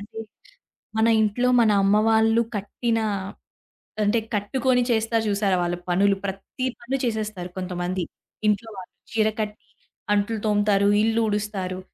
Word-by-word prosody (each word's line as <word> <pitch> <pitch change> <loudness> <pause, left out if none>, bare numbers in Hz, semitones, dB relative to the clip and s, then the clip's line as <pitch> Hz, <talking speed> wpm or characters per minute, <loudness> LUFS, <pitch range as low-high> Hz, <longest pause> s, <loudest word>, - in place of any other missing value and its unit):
అంటే 210 +2 -9 0.8
మన 220 +1 +4
ఇంట్లో 230 +4 +1
మన 220 - +4
అమ్మ 195 +1 +4
వాళ్ళు 225 +1 +4
కట్టిన 225 +3 -1 1.0
అంటే 210 +3 +2 0.2
కట్టుకొని 250 +4 +1
చేస్తారు 225 0 +1
జూసారా 200 -2 +1
వాళ్ళ 175 0 -1
పనులు 195 +3 +3
ప్రత్తి 195 +6 -4 0.2
పని 260 +3 -2
చేసేస్తారు 215 -5 -3
కొంతమంది 180 0 -3 0.5
ఇంట్లో 210 +2 0
వాళ్ళు. 185 -1 -9 0.2
చీర 220 -1 +3
కట్టి, 210 0 -5 0.5
అంట్లు 210 +2 0
తోముతారు, 205 -1 +3
ఇల్లూడుస్తారు 210 -4 -1
210 Hz, 120 wpm, -24 LUFS, 195-225 Hz, 1.0 s, మన